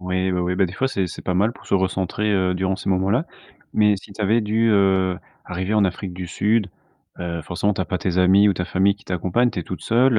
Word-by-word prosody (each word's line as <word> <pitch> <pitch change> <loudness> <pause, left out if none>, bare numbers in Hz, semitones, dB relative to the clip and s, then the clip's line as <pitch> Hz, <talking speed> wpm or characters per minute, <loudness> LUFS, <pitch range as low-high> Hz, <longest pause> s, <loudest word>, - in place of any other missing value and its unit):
Oui, 95 +1 -1
oui, 90 - -1
oui, 90 +1 -1
bah, 95 - +3
des 85 - -9
fois, 135 +7 0
c'est 100 -8 -1
c'est 85 - -8
pas 90 - -1
mal 105 +5 +2
pour - - -17
se - - 0
recentrer, 95 +2 0
heu, 95 -2 +2
durant 95 +1 -1
ces 100 - -3
moments-là, 95 - +1 0.5
mais 105 -1 +3
si 95 +1 -12
tu 105 - -11
avais 110 +3 +2
dû, 110 +2 +1
heu, 95 -3 +3 0.3
arriver 90 +3 -3
en 105 -2 +4
Afrique 90 0 -5
du 90 0 -6
Sud, 105 +4 +1 0.5
heu, 85 -1 -4
forcément, 95 +5 -1
tu 95 - -4
as 90 - -1
pas 95 - -1
tes 90 0 -1
amis 95 +3 +5
ou 100 - +4
ta 90 -1 -3
famille 95 +2 +2
qui 100 - -23
t'accompagne, 95 +7 +1
tu - - -6
es - - -5
toute 90 0 -7
seule, 120 +3 +3
95 Hz, 260 wpm, -22 LUFS, 90-105 Hz, 0.5 s, amis